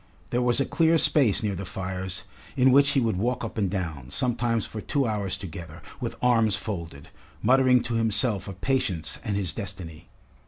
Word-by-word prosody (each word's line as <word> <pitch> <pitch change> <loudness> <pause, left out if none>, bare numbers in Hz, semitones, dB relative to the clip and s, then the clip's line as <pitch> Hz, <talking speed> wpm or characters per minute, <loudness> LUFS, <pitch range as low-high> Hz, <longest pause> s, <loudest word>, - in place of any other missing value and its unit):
There 120 - +1
was 120 0 +3
a 135 - +2
clear 165 0 +3
space 130 -10 +3
near 105 -2 0
the 95 +1 -5
fires 95 0 -4 0.3
in 130 +1 +5
which 140 +2 +5
he 135 - +3
would 115 -6 0
walk 120 +6 -1
up - - -7
and 100 -4 0
down, 80 -9 -4
sometimes 120 - 0
for 110 - -7
two 140 +4 0
hours 100 -4 -2
together, 85 -3 -9 0.2
with - - -4
arms 115 -4 +3
folded, 85 -9 -6 0.3
muttering 130 -1 +4
to 120 0 -3
himself 110 -2 +2
of 95 -1 -9
Patience 100 - -1
and 105 - -2
his 95 -4 -1
destiny. 90 -6 -7
105 Hz, 185 wpm, -26 LUFS, 95-125 Hz, 0.3 s, in